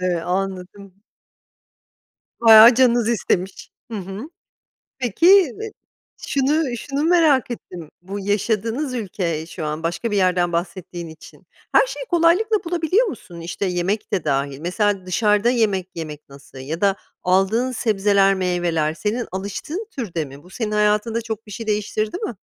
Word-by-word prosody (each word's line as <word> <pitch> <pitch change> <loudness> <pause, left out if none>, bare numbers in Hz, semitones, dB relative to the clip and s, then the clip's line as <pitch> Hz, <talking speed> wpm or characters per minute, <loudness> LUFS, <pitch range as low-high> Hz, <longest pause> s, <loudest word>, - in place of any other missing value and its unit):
Eee, 180 -2 0
anladım. 190 +2 -5 1.4
Bayağı 225 +1 +9
canınız 240 -2 +3
istemiş. 190 -4 -1 0.2
Hı 220 - -3
hı. 195 - -7 0.7
Peki, 245 - 0
iii, 395 - +4 0.6
şunu 275 -1 +1
şunu 280 +5 -3
merak 315 -7 +3
ettim. 175 -8 -8
Bu 195 +3 -6
yaşadığınız 220 +7 -1
ülke 180 -8 -3
şu 165 -1 -7
an, 150 +1 -4
başka 170 +7 -2
bir 205 - +1
yerden 180 -2 +2
bahsettiğin 175 0 -4
için. 160 0 -15 0.2
Her - - +5
şeyi - - -6
kolaylıkla 350 +6 +3
bulabiliyor 350 +6 +1
musun? 190 - -8
İşte, 170 +4 -4
yemek 185 +4 -2
de 185 -5 0
dâhil. 140 -1 -1
Mesela 190 +3 -1
dışarıda 210 +4 +2
yemek 205 -7 +1
yemek 150 -3 -7
nasıl? 140 0 -15
Ya 150 +6 -5
da 200 -1 +3 0.3
aldığın 195 +7 +2
sebzeler, 200 -4 +2
meyveler 175 -4 0
senin 210 +9 -3
alıştığın 205 - -5
türde 180 - -4
mi? 140 +1 -13
Bu 180 - -17
senin 210 +2 -4
hayatında 210 +2 +1
çok 225 -1 -6
bir - - -11
şey 225 +2 -7
değiştirdi 215 - -1
mi? 375 - -4
205 Hz, 145 wpm, -21 LUFS, 180-240 Hz, 1.4 s, Bayağı